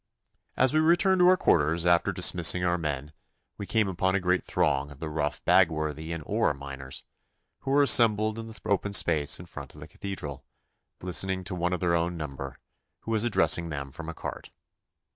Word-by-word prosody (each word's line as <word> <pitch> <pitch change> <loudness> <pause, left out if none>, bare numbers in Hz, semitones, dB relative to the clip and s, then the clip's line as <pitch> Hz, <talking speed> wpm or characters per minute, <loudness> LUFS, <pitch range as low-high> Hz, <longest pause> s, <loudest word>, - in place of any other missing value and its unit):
As 130 +2 +3
we 155 - +3
returned 175 +4 +2
to 180 - +5
our 185 0 +5
quarters 80 - +1
after 85 -1 +2
dismissing 90 +1 +4
our 90 0 0
men 75 -2 -5 0.5
we 100 - -6
came 110 +1 +1
upon 95 0 -1
a - - +1
great 90 0 0
throng 75 -7 -1
of 70 - -13
the 80 -1 -6
rough 75 -1 -3
Bagworthy 80 -3 +1
and 85 -2 -5
Oare - - 0
miners, 70 -1 -8 0.6
who - - -7
were 145 +1 +4
assembled 110 -4 +4
in 115 - -8
the 110 -1 -7
open 100 0 -1
space 80 -6 +3
in 90 - -10
front 75 -5 -10
of - - -13
the 75 - -10
Cathedral, 85 -8 -7 0.6
listening 95 +2 -1
to 90 - -6
one 90 0 -2
of 90 - -3
their 85 -1 +1
own 85 +1 -1
number, 70 -3 -7 0.5
who 115 - -7
was 110 -1 +1
addressing 95 -6 +2
them 70 -3 -6
from 85 +3 -9
a 85 - -7
cart. - - -8
85 Hz, 195 wpm, -26 LUFS, 75-100 Hz, 0.6 s, to